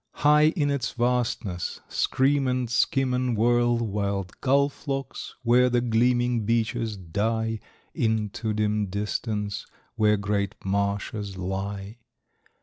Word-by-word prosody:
High 150 +1 +5
in 145 -4 +1
its 140 -4 -2
vastness 120 -7 -1
scream 135 +1 +1
and 125 -1 0
skim 130 +1 +2
and 125 -2 0
whirl 120 +1 +3
White 100 -4 -2
gull 140 +1 +4
flocks 135 -1 -5
where 125 +1 +5
the 120 0 +2
gleaming 120 0 +2
beaches 115 0 0
die 110 +5 -1 0.3
Into 110 -1 -1
dim 105 -1 0
distance, 105 +1 -3 0.3
where 105 -1 +4
great 100 -1 -1
marshes 100 0 -2
lie. 100 +3 -4
115 Hz, 115 wpm, -26 LUFS, 100-125 Hz, 0.3 s, High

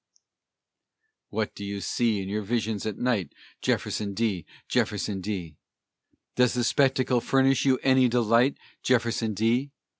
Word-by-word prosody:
What 110 0 -2
do 100 - -8
you 100 0 -4
see 105 +3 0
in - - -7
your 105 +2 -2
visions 110 0 -2
at 105 - -4
night, 115 - -1 0.3
Jefferson 100 -2 -1
D., 105 -6 -1 0.2
Jefferson 100 -1 -1
D.? 90 -6 -5 0.8
Does 125 -1 +3
the 120 - +1
spectacle 130 -1 +2
furnish 135 +1 +2
you 130 -1 +4
any 130 -1 +5
delight, 120 +2 +3 0.2
Jefferson 115 -3 +1
D.? 115 +7 +1
115 Hz, 130 wpm, -26 LUFS, 100-125 Hz, 0.8 s, any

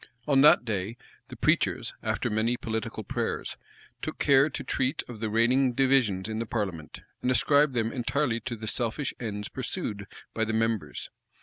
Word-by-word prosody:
On 135 -2 +5
that 145 -4 +7
day, 105 +1 -3 0.3
the - - -9
preachers, - - +1
after - - -1
many 110 +3 +1
political 110 -2 -4
prayers, - - -3 0.5
took - - -4
care 140 +1 +5
to 140 - -5
treat 130 0 -1
of 120 -3 -9
the 110 0 -2
reigning 125 +4 +3
divisions 120 -8 +2
in 110 0 -3
the 115 - -3
parliament, 95 -9 -4 0.2
and 125 - 0
ascribed 145 +2 +4
them 115 -1 0
entirely 125 -1 0
to 120 - -5
the 110 0 -8
selfish 120 +5 -1
ends 105 -3 -4
pursued 115 - -4 0.3
by 110 - 0
the 110 0 -1
members. 110 -8 -1
115 Hz, 170 wpm, -28 LUFS, 110-130 Hz, 0.5 s, that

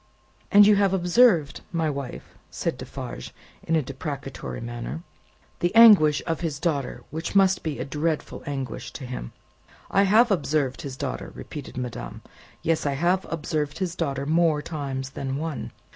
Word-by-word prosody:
"And 205 0 +8
you 210 0 +6
have 195 -1 +3
observed, 175 - +3
my 165 -2 0
wife," 140 -4 -5 0.2
said - - -2
Defarge, 60 0 -7 0.3
in 165 - 0
a 155 - +2
deprecatory 135 +1 -6
manner, 120 +7 -6 0.6
"the 175 +4 0
anguish 200 -11 +8
of 165 -1 -2
his 160 -5 -2
daughter, 145 -5 -2
which 160 +5 -4
must 190 -1 +4
be 155 -3 -3
a 125 - -3
dreadful 150 +2 -2
anguish 135 -3 -4
to 135 - -7
him!" 125 - -6 0.6
"I 195 - +4
have 225 +3 +5
observed 150 -7 0
his 135 -4 -6
daughter," 135 -2 -4
repeated 140 -4 -8
madame; 120 - -6 0.4
"yes, 160 -2 +1
I 140 - +1
have 175 +6 +1
observed 150 -2 -2
his 185 -3 -2
daughter, 140 -5 -2
more 160 0 +3
times 135 -4 -4
than 135 0 -3
one. 155 -3 -4
150 Hz, 160 wpm, -25 LUFS, 135-175 Hz, 0.6 s, And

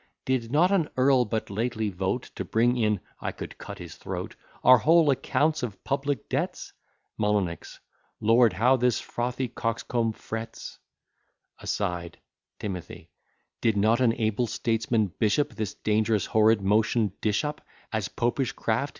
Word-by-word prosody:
Did 125 -3 -1
not 170 +6 +4
an 175 -6 +2
earl 130 -1 +4
but 110 -1 -3
lately 110 +1 -1
vote, 95 +6 -2
To - - -4
bring 120 +2 +2
in 105 -5 +1 0.2
(I - - -3
could - - -9
cut - - -8
his - - -9
throat) - - -5 0.3
Our 130 -1 +8
whole 160 0 +5
accounts 150 +4 +1
of 110 -7 -5
public 140 +1 -2
debts? - - -3 0.5
M. 105 -5 +2 0.7
Lord, 115 +1 +4
how 125 +3 +4
this 125 -1 +2
frothy 125 +2 -3
coxcomb 115 -1 -1
frets! 115 +1 -7 0.8
[Aside. 85 -1 -3 0.4
T. 95 -4 -6 0.5
Did 110 -3 +2
not 110 +4 +3
an 120 -3 +4
able 110 +2 0
statesman 115 -4 0
bishop 140 +7 +2
This 110 -3 -4
dangerous 110 -1 +1
horrid 110 -2 +3
motion 105 0 +2
dish 105 +4 +1
up 150 0 -4 0.3
As 110 -4 -1
Popish 120 +1 -1
craft? 115 +6 -1
115 Hz, 140 wpm, -27 LUFS, 105-130 Hz, 0.8 s, Our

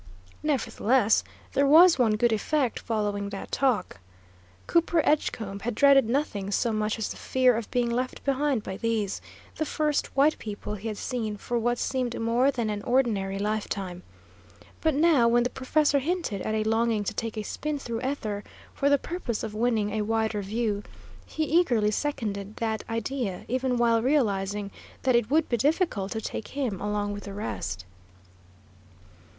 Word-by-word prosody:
Nevertheless, 255 -6 +2 0.3
there 280 0 +3
was 330 +1 +7
one 225 -4 +4
good 235 +1 +2
effect 260 +3 0
following 205 -3 -2
that 195 -1 -7
talk. 240 - 0 0.7
Cooper 335 -1 +2
Edgecombe 220 -9 0
had 225 +2 -3
dreaded 275 -3 +5
nothing 230 -7 -1
so 225 +3 +1
much 215 0 0
as 220 - -2
the - - -6
fear 255 -2 +3
of 225 -1 -4
being 240 -2 0
left 255 +2 -2
behind 275 -4 +1
by 190 - -5
these, 220 -3 -1 0.4
the - - 0
first 300 -1 0
white 295 +3 +4
people 210 -1 -6
he 210 +2 -5
had 215 -2 -4
seen 220 -4 -3
for 240 +4 -2
what 240 +1 0
seemed 250 -2 -2
more 235 +4 +2
than 235 -5 -1
an 205 -1 -3
ordinary 215 -6 +1
lifetime; 200 -3 -3 0.8
but 315 -3 +2
now, 300 -6 +4
when 240 +1 +4
the 250 - -1
professor 285 +2 +2
hinted 310 - -2
at 215 - -2
a 215 - +1
longing 225 -1 +1
to 215 - -3
take 225 0 -4
a 215 - -2
spin 300 +7 -3
through 235 -4 -4
ether, 220 -7 -3 0.3
for 280 - +1
the 285 - +5
purpose 275 -7 -4
of 220 -2 -4
winning 220 -2 +1
a 215 +1 -1
wider 220 0 0
view, 210 +1 -1 0.5
he 315 - -2
eagerly 265 -10 +3
seconded 210 -6 -3
that 220 -1 -2
idea, 230 -3 -3
even 255 0 0
while 230 -1 +3
realising 205 -7 0 0.3
that 255 -2 +3
it 235 -2 +2
would 310 +2 +3
be 240 - 0
difficult 285 - +1
to 220 - -2
take 220 - -5
him 255 -9 -3
along 205 0 -1
with 205 - -7
the 200 - -7
rest. 95 - -4
230 Hz, 170 wpm, -27 LUFS, 210-270 Hz, 0.8 s, was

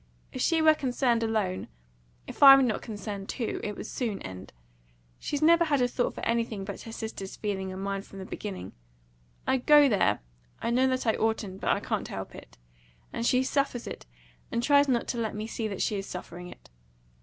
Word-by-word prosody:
If 255 - -4
she 325 +2 +2
were 315 0 +7
concerned 250 -4 +1
alone 215 -5 -1 0.6
if - - -10
I 275 -1 +12
were 270 - +4
not 230 -4 0
concerned 205 -2 -6
too 235 -4 -3
it 210 -1 -4
would - - -6
soon 220 -4 -3
end. 95 0 -8 0.7
She's 290 +1 -2
never 335 +1 +6
had 290 -3 +2
a 245 - +3
thought 245 0 -1
for - - -5
anything 230 -4 -1
but 200 -1 -6
her 225 - -9
sister's 220 -4 -6
feeling 190 -3 -3
and 190 +1 -6
mine 195 0 -2
from 195 - -13
the 190 - -7
beginning. 190 - -6 0.7
I 265 - +2
go 295 +3 +6
there, 210 - +2 0.4
I 230 - -1
know 255 +2 +3
that 255 -1 -1
I 220 - +3
oughtn't, 215 -4 -1
but - - -1
I - - +2
can't - - -2
help - - -6
it, - - -13 0.6
and 235 - -1
she 255 +1 +3
suffers 260 -3 -1
it, - - -8 0.4
and 235 - -1
tries 285 +1 +5
not 245 -3 +1
to 240 - -2
let 220 -2 -2
me 210 +1 -4
see 225 0 -3
that 195 -3 -2
she 210 - 0
is 195 - -6
suffering 180 0 -7
it. 180 - -14
225 Hz, 210 wpm, -28 LUFS, 195-260 Hz, 0.7 s, I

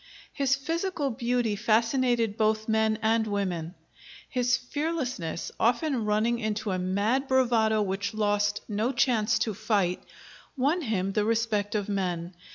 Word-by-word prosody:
His 270 -1 +2
physical 325 0 -2
beauty 240 -2 0
fascinated 230 +1 +1
both 215 0 +1
men 220 -1 +2
and 220 0 +2
women; 185 -4 -2 0.5
his 245 -2 +1
fearlessness, 255 - -3
often 240 +1 +1
running 220 +3 +1
into 215 -2 -2
a 185 - -1
mad 205 +9 0
bravado 230 -5 +3
which 200 +2 -3
lost 205 -1 +1
no 220 +4 0
chance 240 -4 +2
to 220 - -1
fight, 195 -3 0 0.6
won 290 +7 +1
him 200 - -1
the 210 +1 +1
respect 220 -2 0
of 205 -2 -1
men. 180 -3 -2
220 Hz, 135 wpm, -27 LUFS, 205-245 Hz, 0.6 s, bravado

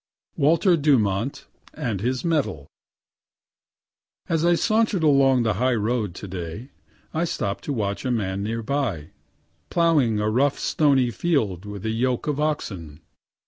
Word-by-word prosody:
WALTER 170 +5 +3
DUMONT 120 -5 +1 0.3
AND 115 - -3
HIS 125 - -1
MEDAL 145 - 0 1.6
As 165 -1 0
I 175 0 +4
saunter'd 215 -2 +1
along 135 -4 +4
the 110 - +1
high 130 -1 +3
road 110 -3 -1
yesterday, 95 - -7 0.4
I 160 - 0
stopp'd 100 -11 -3
to - - -2
watch 100 -4 -2
a 130 - -2
man 100 -5 -1
near 115 +2 -3
by, 110 - -2 0.6
ploughing 150 -11 +2
a 105 - 0
rough 130 +6 +2
stony 135 -5 +2
field 110 - -1
with 105 0 -7
a 110 - 0
yoke 125 +2 0
of 150 -1 -1
oxen. 95 - -3
125 Hz, 140 wpm, -24 LUFS, 105-150 Hz, 1.6 s, I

